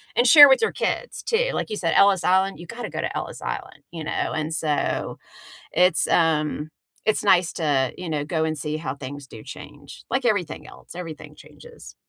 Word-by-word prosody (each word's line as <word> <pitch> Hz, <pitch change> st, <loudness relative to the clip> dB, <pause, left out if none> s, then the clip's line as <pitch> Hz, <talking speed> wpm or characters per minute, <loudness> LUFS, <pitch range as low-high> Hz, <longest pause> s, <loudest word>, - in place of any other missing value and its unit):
and 240 Hz, -, +3 dB
share 290 Hz, +1 st, +10 dB
with 265 Hz, -, +4 dB
your 450 Hz, -, +1 dB
kids -, -, -3 dB
too, -, -, +1 dB
like -, -, -3 dB
you 215 Hz, -, -3 dB
said, 165 Hz, -4 st, 0 dB
Ellis 195 Hz, -2 st, +4 dB
Island, 190 Hz, 0 st, +2 dB
you 175 Hz, -, -9 dB
gotta 240 Hz, +4 st, -7 dB
go -, -, -4 dB
to -, -, -4 dB
Ellis -, -, -6 dB
Island, -, -, -6 dB
you 165 Hz, -2 st, -7 dB
know, -, -, -2 dB
and 155 Hz, +1 st, -3 dB
so, 155 Hz, -3 st, -1 dB, 0.6 s
it's, 180 Hz, -2 st, +3 dB
um, 155 Hz, -2 st, +1 dB, 0.4 s
it's 215 Hz, -1 st, +1 dB
nice 180 Hz, -4 st, +4 dB
to, 140 Hz, -5 st, 0 dB
you 180 Hz, -3 st, -6 dB
know, 145 Hz, -2 st, -2 dB
go 160 Hz, 0 st, -1 dB
and 155 Hz, -1 st, -2 dB
see 150 Hz, +1 st, -3 dB
how 135 Hz, -5 st, -4 dB
things 140 Hz, 0 st, -8 dB
do 110 Hz, -, -11 dB
change, 145 Hz, +1 st, -12 dB
like 265 Hz, +1 st, 0 dB
everything 195 Hz, -8 st, -1 dB
else, -, -, -13 dB
everything 165 Hz, -4 st, -8 dB
changes. 480 Hz, -1 st, -14 dB
165 Hz, 200 wpm, -23 LUFS, 150-200 Hz, 0.6 s, share